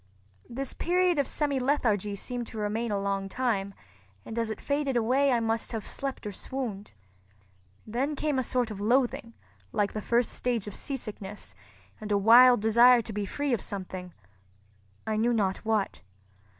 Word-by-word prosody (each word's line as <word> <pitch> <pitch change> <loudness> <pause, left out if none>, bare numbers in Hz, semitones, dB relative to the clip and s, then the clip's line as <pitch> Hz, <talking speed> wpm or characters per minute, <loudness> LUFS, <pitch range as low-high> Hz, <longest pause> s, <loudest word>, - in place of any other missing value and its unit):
This 265 +2 -5
period 355 -1 +2
of 280 - +1
semilethargy 255 -8 0
seemed 245 +2 -5
to 225 - -9
remain 215 +3 -1
a 205 -1 0
long 195 0 -2
time, 200 -5 -1 0.5
and 225 - -4
as 230 -1 -1
it 220 - -5
faded 280 -3 0
away 260 +5 +3
I 240 - +3
must 225 +1 -1
have 220 -2 -4
slept 275 -4 -5
or 210 - -3
swooned. 210 -2 -5 0.9
Then 260 +7 -1
came 290 -2 0
a - - 0
sort 245 -2 -1
of 200 -1 -6
loathing, 235 0 +1 0.4
like 205 -1 0
the 215 - -3
first 235 +2 +1
stage 240 -4 -1
of 205 - -7
seasickness, 210 - -7 0.5
and 215 -1 -6
a 205 - +4
wild 240 +3 +7
desire 235 +2 +6
to 220 - -7
be 205 -1 -3
free 285 +5 -1
of 225 - 0
something—I 100 - -8
knew 235 +2 +2
not 195 -4 +1
what. 220 -3 -1
225 Hz, 165 wpm, -28 LUFS, 200-255 Hz, 0.9 s, wild